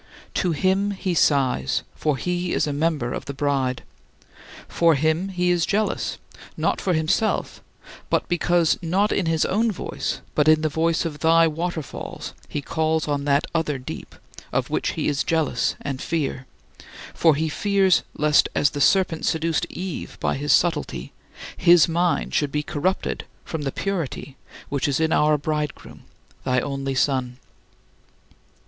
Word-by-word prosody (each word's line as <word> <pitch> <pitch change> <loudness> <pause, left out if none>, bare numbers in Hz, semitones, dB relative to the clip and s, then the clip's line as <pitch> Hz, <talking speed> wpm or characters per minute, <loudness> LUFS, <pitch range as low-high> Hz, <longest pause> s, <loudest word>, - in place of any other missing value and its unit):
To 180 - +1
Him 190 +5 +1
he 190 -2 -2
sighs, 135 - +2
for 150 -3 -1
he 180 +3 -2
is - - +1
a 145 - -2
member 145 -5 0
of - - -5
the 140 - -6
Bride; 135 -3 0 0.8
for 165 -2 +3
him 160 +6 +1
he 180 -1 +1
is 175 -1 +2
jealous, 210 +4 0 0.4
not - - 0
for 185 - +1
himself, 165 +8 0 0.5
but - - +1
because 175 -1 +2
not 190 +5 +1
in 185 - 0
his 160 -1 +2
own 225 +4 +1
voice 190 - -4
but 150 0 +2
in 155 0 +6
the 155 - +1
voice 160 +2 +1
of 150 -2 -4
thy 165 +2 +5
waterfalls 165 -1 -5 0.2
he 145 - -4
calls 160 +1 0
on 145 -1 -1
that 140 0 +2
other 155 -4 0
deep, 125 - -8 0.4
of - - -1
which - - 0
he - - -2
is 145 -1 +1
jealous 160 -2 0
and 135 -3 -4
in - - -6
fear; 140 -5 -2 0.7
for 160 -3 +4
he 160 +2 0
fears 195 +2 +2
lest, 150 0 +3
as 145 - +3
the 145 - -4
serpent 175 0 +3
seduced 160 -1 0
Eve 185 -1 -6
by - - 0
his 145 +1 -1
subtlety, 160 - +1 0.4
his 175 -2 +6
mind 170 +1 0
should 145 -2 +1
be 150 +1 -1
corrupted 180 +7 -2 0.2
from 160 - -4
the 140 -2 -2
purity 165 -8 -4 0.3
which 140 0 -1
is 140 0 0
in 160 0 +2
our 150 0 +4
Bridegroom, 150 0 -4 0.4
thy 125 0 +2
only 135 0 -3
Son. 125 -2 0
160 Hz, 160 wpm, -23 LUFS, 145-175 Hz, 0.8 s, in